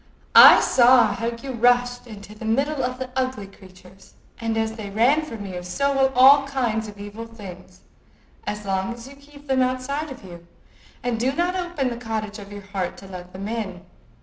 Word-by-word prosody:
I -, -, +10 dB
saw 240 Hz, -4 st, +5 dB
how 230 Hz, +3 st, -4 dB
you 235 Hz, +3 st, -5 dB
rushed 245 Hz, +1 st, +1 dB
into 210 Hz, -2 st, -11 dB
the 215 Hz, -, -12 dB
middle 275 Hz, +6 st, 0 dB
of 255 Hz, 0 st, -3 dB
the 260 Hz, 0 st, -6 dB
ugly 255 Hz, -5 st, -2 dB
creatures; 190 Hz, -1 st, -18 dB, 0.2 s
and 225 Hz, -1 st, -2 dB
as 220 Hz, 0 st, 0 dB
they 215 Hz, -3 st, -7 dB
ran 240 Hz, +9 st, +3 dB
from 230 Hz, -10 st, -8 dB
you, 180 Hz, -2 st, -6 dB
so 280 Hz, +11 st, -1 dB
will 270 Hz, 0 st, +3 dB
all 275 Hz, +2 st, +7 dB
kinds 235 Hz, -5 st, -2 dB
of 205 Hz, -1 st, -11 dB
evil 205 Hz, +3 st, -8 dB
things, 195 Hz, -6 st, -12 dB, 0.7 s
as 210 Hz, 0 st, -4 dB
long 195 Hz, +4 st, -2 dB
as 235 Hz, +1 st, -12 dB
you 275 Hz, -, -13 dB
keep 285 Hz, +1 st, -17 dB
them 265 Hz, -2 st, +1 dB
outside 255 Hz, +4 st, -2 dB
of 265 Hz, -5 st, -10 dB
you, 170 Hz, -2 st, -12 dB, 0.6 s
and 240 Hz, -2 st, -2 dB
do 260 Hz, +3 st, 0 dB
not 350 Hz, +4 st, -1 dB
open 350 Hz, -7 st, -2 dB
the 235 Hz, -, -5 dB
cottage 215 Hz, -2 st, -4 dB
of 200 Hz, 0 st, -11 dB
your 205 Hz, 0 st, -9 dB
heart 195 Hz, -2 st, -4 dB
to 195 Hz, -, -12 dB
let 180 Hz, -1 st, -10 dB
them 195 Hz, +2 st, -7 dB
in. 195 Hz, -6 st, -5 dB
230 Hz, 200 wpm, -23 LUFS, 200-260 Hz, 0.7 s, I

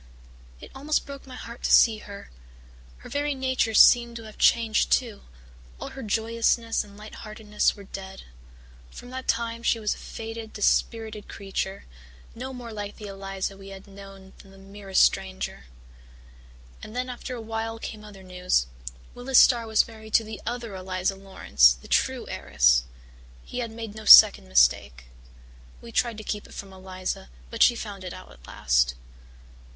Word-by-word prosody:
It -, -, -12 dB
almost 295 Hz, +3 st, -1 dB
broke 280 Hz, -1 st, -10 dB
my 255 Hz, -, -10 dB
heart 235 Hz, -1 st, -10 dB
to -, -, -1 dB
see 220 Hz, -2 st, +6 dB
her. 200 Hz, -1 st, -11 dB, 0.7 s
Her -, -, -13 dB
very 290 Hz, 0 st, -1 dB
nature 260 Hz, -4 st, 0 dB
seemed 235 Hz, +1 st, +6 dB
to 230 Hz, -, -7 dB
have 215 Hz, -1 st, -13 dB
changed 225 Hz, -2 st, +3 dB
too 230 Hz, -6 st, 0 dB, 0.6 s
all -, -, -6 dB
her 270 Hz, -, -9 dB
joyousness 230 Hz, +1 st, 0 dB
and 205 Hz, -1 st, -16 dB
light 210 Hz, +1 st, -11 dB
heartedness 215 Hz, -1 st, -1 dB
were 200 Hz, -, -12 dB
dead. 190 Hz, 0 st, -9 dB, 0.7 s
From 245 Hz, -, -12 dB
that 260 Hz, 0 st, -7 dB
time 230 Hz, 0 st, -1 dB
she 235 Hz, -1 st, +1 dB
was 210 Hz, -1 st, -1 dB
a -, -, -12 dB
faded, 225 Hz, 0 st, -8 dB
dispirited 215 Hz, 0 st, -1 dB
creature, 195 Hz, 0 st, -5 dB, 0.5 s
no 260 Hz, +3 st, -7 dB
more 245 Hz, -3 st, -8 dB
like 205 Hz, -1 st, -6 dB
the 210 Hz, -, -9 dB
Eliza 195 Hz, 0 st, -5 dB
we 195 Hz, 0 st, -13 dB
had 195 Hz, 0 st, -11 dB
known 195 Hz, -1 st, -13 dB
than 195 Hz, -, -16 dB
the 195 Hz, -, -17 dB
merest 195 Hz, 0 st, 0 dB
stranger. 65 Hz, +1 st, -1 dB, 1.2 s
And 215 Hz, -, -10 dB
then 250 Hz, +1 st, -2 dB
after 250 Hz, +1 st, -6 dB
a -, -, -7 dB
while 225 Hz, 0 st, -4 dB
came 215 Hz, -1 st, -8 dB
other 200 Hz, -2 st, -13 dB
news 180 Hz, -, 0 dB, 0.5 s
Willis 245 Hz, +1 st, 0 dB
Starr 235 Hz, -2 st, +6 dB
was 220 Hz, -1 st, +3 dB
married 220 Hz, -1 st, -6 dB
to 225 Hz, -, +5 dB
the 220 Hz, 0 st, -8 dB
other 235 Hz, -3 st, -4 dB
Eliza 185 Hz, 0 st, -2 dB
Laurance, 190 Hz, -, +3 dB
the -, -, -14 dB
true -, -, 0 dB
heiress. 60 Hz, -3 st, +2 dB, 0.6 s
He 250 Hz, -, -6 dB
had 235 Hz, -2 st, -3 dB
made 225 Hz, -1 st, -8 dB
no 215 Hz, 0 st, -10 dB
second 65 Hz, -, +9 dB
mistake. 60 Hz, 0 st, +2 dB, 0.8 s
We 235 Hz, -, -12 dB
tried 235 Hz, -1 st, 0 dB
to 215 Hz, -, -8 dB
keep 210 Hz, 0 st, -5 dB
it -, -, -14 dB
from 195 Hz, -1 st, -9 dB
Eliza 185 Hz, -, -6 dB, 0.2 s
but -, -, -5 dB
she 240 Hz, -, +6 dB
found 205 Hz, -4 st, -7 dB
it 180 Hz, -, -6 dB
out -, -, -12 dB
at -, -, -17 dB
last. -, -, +1 dB
215 Hz, 170 wpm, -25 LUFS, 195-230 Hz, 1.2 s, second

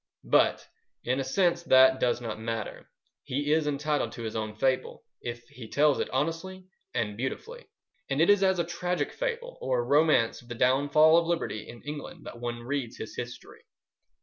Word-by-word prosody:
But -, -, +3 dB, 0.4 s
in 125 Hz, +2 st, 0 dB
a -, -, 0 dB
sense 170 Hz, +5 st, +1 dB
that 130 Hz, -4 st, +6 dB
does 120 Hz, 0 st, +1 dB
not 110 Hz, -2 st, -5 dB
matter. 115 Hz, -1 st, -5 dB, 0.3 s
He 145 Hz, +3 st, -1 dB
is 155 Hz, -1 st, +2 dB
entitled 150 Hz, 0 st, -1 dB
to 115 Hz, -, -7 dB
his 110 Hz, 0 st, -4 dB
own 110 Hz, -1 st, -3 dB
fable, 130 Hz, +3 st, -1 dB, 0.2 s
if 120 Hz, 0 st, -6 dB
he 125 Hz, -5 st, -10 dB
tells 145 Hz, +3 st, +3 dB
it -, -, -1 dB
honestly 165 Hz, +7 st, -3 dB, 0.3 s
and 110 Hz, -4 st, -1 dB
beautifully; 450 Hz, -, -5 dB, 0.4 s
and 135 Hz, +1 st, 0 dB
it 165 Hz, -, +5 dB
is 205 Hz, -1 st, +5 dB
as 190 Hz, -1 st, +3 dB
a 170 Hz, -, +2 dB
tragic 175 Hz, +1 st, -2 dB
fable -, -, -4 dB
or 125 Hz, -2 st, 0 dB
romance 145 Hz, -4 st, +3 dB
of 120 Hz, -, -20 dB
the 120 Hz, -, -6 dB
downfall 145 Hz, +6 st, +5 dB
of 170 Hz, -, -3 dB
liberty 170 Hz, -10 st, -2 dB
in 120 Hz, 0 st, -11 dB
England 150 Hz, 0 st, -7 dB
that 120 Hz, -, -9 dB
one 120 Hz, 0 st, -4 dB
reads 130 Hz, -2 st, -3 dB
his 110 Hz, -, -7 dB
History. 120 Hz, 0 st, -8 dB
135 Hz, 180 wpm, -28 LUFS, 120-165 Hz, 0.4 s, that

